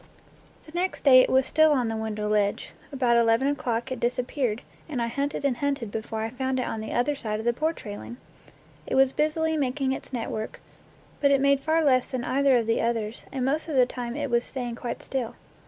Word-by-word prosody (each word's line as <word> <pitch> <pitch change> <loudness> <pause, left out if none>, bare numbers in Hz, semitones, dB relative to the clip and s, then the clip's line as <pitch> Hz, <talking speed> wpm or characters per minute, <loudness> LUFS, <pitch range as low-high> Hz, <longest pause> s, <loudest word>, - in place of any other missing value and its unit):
The 310 - -13
next 360 +3 -2
day 265 -3 +8
it - - +1
was 260 0 +3
still 315 +3 +4
on 250 -4 +1
the 225 - -2
window 215 -1 -3
ledge. 210 -1 0 0.2
About 250 -4 +2
eleven 230 +3 +3
o'clock 255 -3 -1
it 260 - -3
disappeared, 245 -1 -1 0.3
and 275 -5 -3
I 235 - +1
hunted 280 +4 -2
and 260 -4 +1
hunted 275 -5 -2
before 220 0 -4
I 225 +1 -3
found 260 +1 -2
it 250 - -1
on 225 - -3
the 220 - -6
under 245 +5 +1
side 220 -6 -3
of 220 - -6
the 240 - +3
porch 310 +3 -2
railing! 205 +3 -7 0.7
It - - -1
was 265 0 +4
busily 320 +1 +1
making 270 -1 0
its 265 - -5
network, 225 -3 -4 0.6
but 280 - +4
it 275 -1 +4
made 280 0 +3
far 320 +3 +1
less 255 -4 +3
than 255 -2 -3
either 270 0 +3
of 230 - 0
the 225 +1 +1
others, 230 -1 -2
and 260 -2 -2
most 300 +5 0
of 310 - -3
the 255 -1 +6
time 245 -1 -5
it 285 -3 -3
was 235 0 +3
staying 245 -3 -4
quite 235 0 -5
still. 255 -4 -3
255 Hz, 220 wpm, -26 LUFS, 230-280 Hz, 0.7 s, day